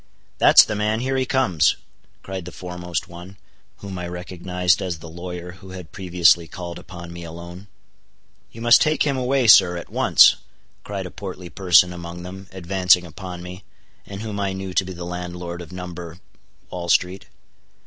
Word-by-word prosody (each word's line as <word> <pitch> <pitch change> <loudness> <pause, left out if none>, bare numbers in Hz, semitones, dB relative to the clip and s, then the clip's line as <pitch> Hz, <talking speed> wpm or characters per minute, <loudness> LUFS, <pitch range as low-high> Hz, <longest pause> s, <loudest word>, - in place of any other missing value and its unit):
"That's - - +8
the 110 - -3
man—here 110 +5 -1
he 130 -1 0
comes," 110 - +2 0.5
cried 95 -2 -6
the 90 - -8
foremost 90 0 -5
one, 90 +2 -12 0.5
whom 95 -2 -6
I 90 - -4
recognized 90 +1 -1
as 90 -3 -3
the 80 - -11
lawyer 90 +1 -7
who 95 +1 -14
had 90 -4 -11
previously 85 -3 +3
called 85 -1 -7
upon 85 -2 -10
me 85 0 -8
alone. 85 +4 -10 0.8
"You 115 - -11
must 120 0 +6
take 155 -1 +2
him 140 -2 0
away, 130 0 +1
sir, 90 -5 +7
at 85 - -9
once," - - +6 0.5
cried 100 -2 -5
a 90 - -7
portly 95 -3 -8
person 90 -1 +4
among 85 0 -8
them, 95 +1 -9
advancing 90 -1 +2
upon 90 +1 -8
me, 90 +2 -9 0.4
and 100 0 -7
whom 105 -2 -5
I 100 -1 -1
knew 95 -1 -6
to 90 - +2
be 95 - -7
the 85 0 -7
landlord 90 0 -6
of 85 - -11
No.—Wall 90 0 -9
street. 90 +2 +1
90 Hz, 170 wpm, -22 LUFS, 85-95 Hz, 0.8 s, That's